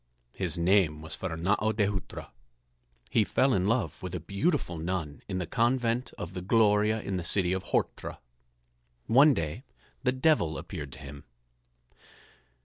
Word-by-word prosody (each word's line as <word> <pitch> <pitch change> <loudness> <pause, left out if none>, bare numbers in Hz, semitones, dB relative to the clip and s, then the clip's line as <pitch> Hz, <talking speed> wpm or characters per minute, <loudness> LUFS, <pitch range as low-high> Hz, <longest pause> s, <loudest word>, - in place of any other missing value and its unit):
His - - -2
name 85 -4 +2
was 80 - -6
Fernâo 95 +5 0
de 105 -2 +3
Hutra. 100 -1 -5 0.8
He 110 - +4
fell 130 +5 +2
in 95 0 +1
love 110 - 0
with 90 -1 -5
a - - -2
beautiful 100 - -1
nun 80 -3 -3
in 95 - -3
the 90 - -2
convent 120 +2 +1
of 85 - -6
the 90 - -5
Gloria 105 +2 +3
in 95 -1 -2
the 90 - -3
city 90 0 +1
of 95 - -1
Horta. - - -2 0.9
One 140 +4 +6
day 80 - -3 0.4
the 125 - +2
Devil 130 - +2
appeared 75 -2 -7
to - - -9
him. 70 -1 -10
95 Hz, 150 wpm, -29 LUFS, 85-115 Hz, 0.9 s, One